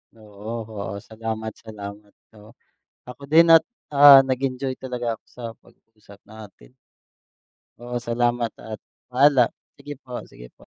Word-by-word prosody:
Oo, 105 0 -10 0.2
oo. 100 -1 -6
Salamat, 110 0 -5
salamat. 105 -1 -10 0.3
Oo. 110 +3 -17 0.5
Ako 135 +3 -10
din 165 +3 +5
at, 165 0 +7 0.2
ah, 140 -1 +9
nag-enjoy 130 0 -3
talaga 120 -3 -4
ako - - -62
sa 125 - -14
pag-uusap 105 -3 -21
natin. 100 - -14 1.1
Oo. 120 0 -7
Salamat 120 0 0
at 110 -1 -9 0.3
paalam. 130 -1 +4 0.3
Sige 145 - -9
po, 125 -2 -8
sige - - -14
po. - - -20
115 Hz, 130 wpm, -23 LUFS, 110-130 Hz, 1.1 s, ah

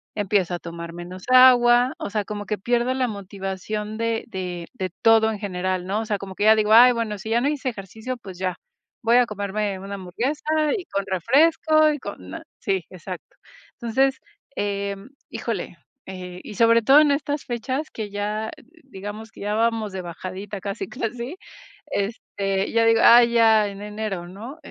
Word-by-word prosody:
empiezo 195 -4 +1
a - - -6
tomar 170 0 -7
menos 175 +2 -9
agua, 250 -1 +6
o - - -4
sea, 210 0 -2
como 205 -1 -6
que 210 - -1
pierdo 240 +4 0
la 260 -1 +1
motivación 200 +1 -5
de 230 0 -1
de 180 -5 -5
de 190 -7 -3
todo 225 -1 +6
en 215 - -4
general, 185 -2 -2
¿no? 200 +3 -1
O - - -5
sea, 210 -2 -1
como 195 -1 -8
que 205 - -1
ya 220 0 +8
digo: 215 0 +2
"Ay, 245 +2 +9
bueno, 225 -3 -3
si 220 - -7
ya 235 +1 +2
no 270 - +1
hice 285 -3 -1
ejercicio, 220 +4 -6
pues 190 -6 -11
ya, 185 -1 -1 0.5
voy 230 +2 +5
a 245 -1 +4
comerme 205 -1 -2
una 195 +1 -6
hamburguesa, 225 - -3 0.3
y 380 -5 -5
con 200 0 -3
refresco 310 - +3
y 295 - -3
con 95 - -8
na" - - -7 0.2
Sí, 190 -3 -1
exacto. 180 0 -9 0.4
Entonces, 265 +3 +2 0.4
em, 200 0 -3 0.2
híjole, - - -4 0.3
eh, 180 -1 -8
y 210 - -9
sobre 230 +2 +5
todo 270 +6 +7
en 300 -1 +5
estas 290 0 -2
fechas 260 +4 -3
que 215 -2 -5
ya, 210 +2 -3 0.3
digamos 210 -2 -8
que - - -14
ya 205 +1 -2
vamos 225 -2 0
de 190 - -4
bajadita 185 +3 -7
casi, 200 +3 -5
casi, 245 - -4 0.5
este, 195 -1 -2
ya 230 0 +4
digo: 225 0 +4
"Ay, 235 0 +8
ya, 220 -2 +5
en 200 0 -9
enero, 210 -4 -4
¿no?". 220 - -9
210 Hz, 180 wpm, -23 LUFS, 195-235 Hz, 0.5 s, Ay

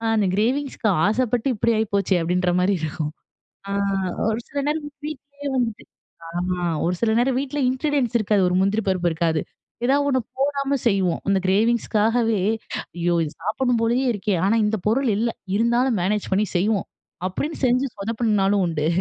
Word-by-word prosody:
அந்த 210 -2 +2
கிரேவிங்ஸ்க்கு 250 +1 0 0.2
ஆசப்பட்டு 245 +2 0
இப்பிடி 230 +3 +1
ஆயிப்போச்சே! 200 -3 +1
அப்பிடின்றமாரி 180 +2 +1
இருக்கும். 155 -1 -3 0.6
ஆ, - - -4 0.6
ஒரு 220 +1 0
சில 285 - -5
நேரம் 300 0 -1 0.2
வீட்டுலயே 285 -1 -7
வந்துட்டு 230 -4 -1 0.4
அ 175 +1 -2 0.2
ஒரு 180 +2 +1
சில 230 -1 +2
நேரம் 250 +1 +2
வீட்டுல 280 +1 -3
இன்கிரீடியன்ட்ஸ் 260 -2 0
இருக்காது, 210 -2 +2
ஒரு 180 - 0
முந்திரி 200 +3 +1
பருப்பு 180 -2 +1
இருக்காது. 160 -1 0 0.4
எதா 270 +3 +4
ஒண்ணு 260 -2 +2 0.2
போடாம 280 0 0
செய்வோம், 195 -5 +2
அந்த 195 -1 +3
கிரேவிங்ஸுக்காகவே 225 +1 +2 0.6
ஐயோ! 175 0 +1
இது 150 - -6
சாப்புட்ண்ணும் 235 +3 0
போலயே 245 +3 +2
இருக்கே! 205 -1 -1
ஆனா, 220 +3 +3
இந்த 220 +1 0
பொருள் 260 +4 +2
இல்ல, 230 +2 +1 0.3
இருந்தாலும் 235 0 +2
மேனேஜ் 205 +2 -1
பண்ணி 205 +3 +2
செய்வோம், 200 +1 +1 0.4
அப்பிடின்னு 290 - -4
செஞ்சு 255 +3 +2
சொதப்புன 220 +1 0
நாளும் 195 0 +2
உண்டு 155 -3 -1
220 Hz, 150 wpm, -23 LUFS, 190-255 Hz, 0.6 s, எதா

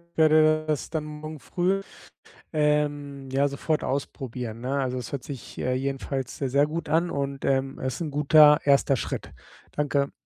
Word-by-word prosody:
werde 155 0 +4
das 155 -2 -2
dann 160 -2 -2
morgen 150 0 -8
früh, 185 +7 0 0.7
ähm, 145 -2 0
ja 140 +2 +2
sofort 150 +3 -1
ausprobieren, 125 -4 -4
ne? 130 +3 -1
Also, 130 -1 -1
das 120 - -6
hört 140 -3 -5
sich, 140 -6 -9
äh, 125 - 0
jedenfalls 135 0 -3
sehr, 135 - -2
sehr 140 +3 +4
gut 160 +2 -4
an 165 +3 +2
und, 140 -1 -3
ähm, 135 0 0
es 130 0 -2
ist - - -8
‘n 155 - -3
guter 150 +1 +6
1. 140 -1 +4
Schritt. - - -5 0.4
Danke. 140 -1 0
140 Hz, 170 wpm, -26 LUFS, 135-155 Hz, 0.7 s, guter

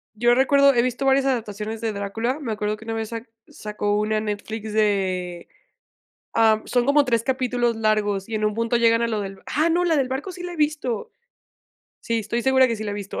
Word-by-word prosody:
yo 240 +2 +3
recuerdo 280 +1 +5
he 235 - +3
visto 255 +2 -2
varias 270 0 +3
adaptaciones 220 -4 -3
de 225 - -1
Drácula. 225 +7 -2
Me 245 -7 -4
acuerdo 210 0 -2
que 220 - -13
una 225 - -3
vez 225 -1 -3
sac 230 0 -7 0.2
sacó 210 -1 -2
una 215 0 0
Netflix 215 +1 -5
de 185 -5 0 0.9
ah, 220 -1 +4
son 245 -1 +1
como 285 +1 +4
3 230 -3 +1
capítulos 245 -2 0
largos, 215 -3 0
y 225 - -4
en 215 - -2
un 210 - 0
punto 230 +1 -1
llegan 230 0 +3
a 235 - +1
lo 215 -2 -1
del 195 -1 -7
ah, 310 +5 +1
no, 350 +2 +2
¡la 330 -2 +2
del 265 -2 0
barco 280 +9 -4
sí 355 0 -9
la 355 0 -5
he - - -7
visto! 295 -7 -1 0.9
Sí, 230 -1 -1
estoy 230 +3 -2
segura 265 0 +5
que 230 -2 -2
sí 215 - -6
la 205 - -3
he - - -4
visto. 200 -1 -6
230 Hz, 225 wpm, -23 LUFS, 210-260 Hz, 0.9 s, recuerdo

